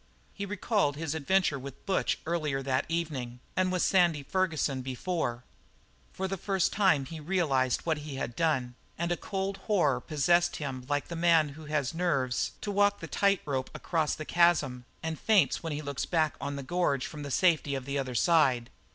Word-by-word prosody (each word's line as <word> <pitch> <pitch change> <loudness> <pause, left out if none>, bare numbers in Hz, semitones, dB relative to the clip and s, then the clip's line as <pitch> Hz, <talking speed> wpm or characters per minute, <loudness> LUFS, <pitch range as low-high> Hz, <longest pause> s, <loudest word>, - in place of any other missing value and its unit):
He 200 0 -5
recalled 205 -6 0
his 160 0 -3
adventure 160 -1 +1
with 135 0 -10
Butch 195 -1 +1
earlier 155 -5 -1
that 130 -1 0
evening 145 -8 -3 0.2
and 185 0 +2
with 185 -1 +1
Sandy 175 -6 +3
Ferguson 155 -5 0
before; 130 -1 -3 0.7
for 190 - -3
the 195 +1 -3
first 190 0 0
time 185 -9 +3
he 160 +4 -7
realized 150 -7 +1
what 160 -2 -1
he 145 -2 -7
had 120 -3 -4
done 130 -6 0 0.2
and 170 +1 -1
a - - +2
cold 195 +1 -3
horror 175 - +2
possessed 175 +4 +2
him 130 -4 -5
like 145 -1 0
the 170 - -4
man 165 -2 +4
who 155 +2 -11
has 150 -3 -1
nerves 140 -8 0
to 205 - -3
walk 205 0 +3
the - - -6
tight 200 -1 +2
rope 130 -3 -2
across 160 -3 0
the 155 - -6
chasm 150 -8 +2 0.2
and 160 -1 -3
faints 215 -4 +3
when 165 - -4
he 150 +1 -3
looks 140 -2 -3
back 160 -3 +2
on 140 0 -3
the 140 - -5
gorge 140 -3 0
from 150 - -7
the 145 - -5
safety 155 -2 +2
of 135 -1 -5
the 140 0 -2
other 130 -2 -3
side. 130 -6 +3
155 Hz, 190 wpm, -29 LUFS, 135-175 Hz, 0.7 s, man